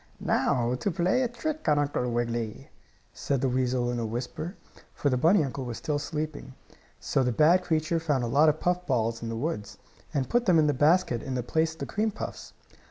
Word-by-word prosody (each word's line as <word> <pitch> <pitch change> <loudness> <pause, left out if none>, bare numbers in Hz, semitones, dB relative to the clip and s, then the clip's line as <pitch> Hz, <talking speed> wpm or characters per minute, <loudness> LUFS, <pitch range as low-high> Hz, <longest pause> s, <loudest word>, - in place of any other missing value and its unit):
"Now 120 0 +1
to 125 +10 -1
play 180 +8 +1
a 255 - +2
trick 285 - -3
on 150 - +4
Uncle 145 -4 0
Wiggily," 115 -2 -3 0.4
said 140 -2 -1
the 135 0 +1
weasel 125 -1 0
in 120 - -2
a - - -2
whisper, 125 - -5 0.4
for 145 - 0
the - - +2
bunny 165 +8 +4
uncle 135 -1 -4
was 120 -2 -5
still 150 -1 -2
sleeping. 150 -3 -5 0.4
So - - 0
the 125 -1 +1
bad 165 +8 +4
creature 160 -1 0
found 145 -6 0
a - - -1
lot 145 +6 +5
of 155 +1 0
puff 180 0 0
balls 115 -3 0
in 115 - -4
the 115 - -3
woods, 105 -6 -4 0.3
and 140 -4 -1
put 240 -1 +1
them 180 -3 +5
in 155 - +5
the 145 - +2
basket 145 -3 +3
in 130 - -4
place 160 +5 0
of 160 - -19
the - - -1
cream 215 +2 0
puffs. 215 - -7
145 Hz, 215 wpm, -27 LUFS, 125-165 Hz, 0.4 s, lot